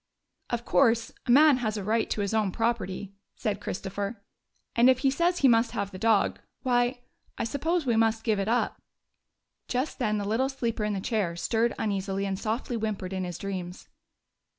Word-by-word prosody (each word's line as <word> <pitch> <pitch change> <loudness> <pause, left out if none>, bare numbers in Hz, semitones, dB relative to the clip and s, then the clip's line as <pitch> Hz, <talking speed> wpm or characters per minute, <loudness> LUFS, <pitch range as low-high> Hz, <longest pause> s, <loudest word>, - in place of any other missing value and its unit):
''Of 240 0 -2
course, 230 -4 +3 0.2
a - - +3
man 290 +1 +7
has 220 -3 -2
a 205 - -3
right 220 +3 +1
to 210 - -1
his 200 +1 -1
own 215 -3 +1
property," 205 -3 -2 0.2
said 205 -2 -2
Christopher, 200 +3 -4 0.3
" - - -46
and 240 +2 +6
if 260 - +5
he 270 - +5
says 345 +5 +1
he 275 - +4
must 230 -1 +3
have 200 0 -2
the 185 - -8
dog, 225 -2 +2 0.2
why, 245 0 +1 0.4
I - - -1
suppose, 310 +7 -1
we 240 -3 +2
must 225 0 +2
give 220 -3 +1
it 195 - -1
up." 240 +2 0 0.9
Just 260 +5 -2
then 215 -4 +1
the 205 - -2
little 240 +6 +1
sleeper 235 -5 -2
in 210 0 0
the 195 - -2
chair 200 -6 -1
stirred 230 +6 0
uneasily 195 -1 -1
and 195 -1 -2
softly 230 +3 -2
whimpered 205 -4 -3
in 185 -1 -2
his 175 -2 -5
dreams. 185 -2 -6
225 Hz, 195 wpm, -28 LUFS, 200-245 Hz, 0.9 s, man